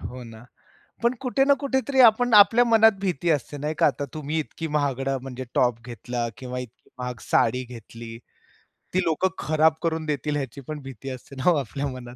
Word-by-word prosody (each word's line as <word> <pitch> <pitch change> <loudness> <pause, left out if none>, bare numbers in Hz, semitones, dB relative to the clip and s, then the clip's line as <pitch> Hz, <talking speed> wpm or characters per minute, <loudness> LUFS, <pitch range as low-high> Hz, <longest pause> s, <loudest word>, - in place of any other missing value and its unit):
हो 125 +9 -7
ना. 115 0 -12 0.6
पण 235 +1 +3
कुठे 270 +1 +1
ना 280 - +6
कुठेतरी 265 -1 0
आपण 240 0 +5
आपल्या 210 +4 +7
मनात 225 -1 +6
भीती 175 -4 -1
असते 145 -1 -1
नाही 150 +2 -3
का? - - +4
आता 145 0 -2
तुम्ही 155 +1 -3
इतकी 160 +1 -5
महागडं 135 -2 0
म्हणजे 130 -1 -7
टॉप 120 -2 +2
घेतला 120 0 -4
किंवा 125 -1 -5
इतकी 125 -2 -11
महाग 125 -2 -5
साडी 125 +3 +1
घेतली. 115 -1 -10 0.8
ती 185 - +2
लोकं 165 +2 +1
खराब 155 0 +3
करून 160 -1 -1
देतील 150 0 -2
ह्याची 135 -1 -5
पण 155 -1 -5
भीती 135 -1 -8
असते 130 +2 -9
ना 135 +6 +2
हो 175 - +4
आपल्या 140 +1 -3
मनात. 125 -2 -8
140 Hz, 190 wpm, -24 LUFS, 125-170 Hz, 0.8 s, आपल्या